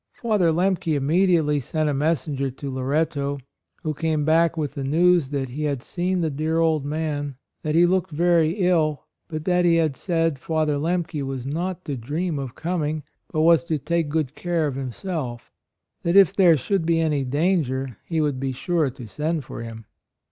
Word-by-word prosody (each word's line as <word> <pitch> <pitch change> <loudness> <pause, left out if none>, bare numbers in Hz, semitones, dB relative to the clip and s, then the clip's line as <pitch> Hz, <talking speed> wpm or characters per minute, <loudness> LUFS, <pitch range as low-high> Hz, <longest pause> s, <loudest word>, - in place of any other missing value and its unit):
Father 210 -8 +1
Lemke 180 -1 +1
immediately 155 0 +2
sent 155 +4 -1
a 145 - +1
messenger 140 -2 0
to 135 +2 -6
Loretto, 140 +1 -1 0.5
who 155 - -1
came 155 -1 -1
back 165 +1 +3
with 150 -3 -1
the 140 - -4
news 165 +1 +3
that 135 -2 -2
he 150 +5 -3
had 140 -4 -2
seen 180 +2 -1
the 160 -2 0
dear 155 +3 -1
old 160 -3 +2
man; 145 -1 -3 0.3
that 155 0 -1
he 170 +1 +6
looked 180 0 +1
very 165 0 +3
ill, 175 -6 +1 0.2
but 155 -1 -5
that 180 -1 +3
he 170 -1 +4
had 160 -4 +2
said 165 -4 0
Father 155 -1 0
Lemke 165 -1 -1
was 135 -2 -4
not 175 +6 -3
to 145 - -3
dream 150 +6 -2
of 130 -2 -6
coming, 155 -3 -2 0.3
but 155 - 0
was 165 0 +5
to 160 -2 0
take 165 +2 -1
good 150 -3 -1
care 170 -1 -1
of 145 - -1
himself; 130 - -5 0.5
that 170 +2 0
if 195 -1 +6
there 175 -5 +6
should 190 +7 0
be 165 0 +2
any 150 -4 +1
danger 135 - 0
he 165 -2 -2
would 145 -4 0
be 135 0 -1
sure 155 +3 0
to 125 -1 -10
send 150 +5 -2
for - - -7
him. 115 -1 -8
155 Hz, 185 wpm, -23 LUFS, 140-170 Hz, 0.5 s, he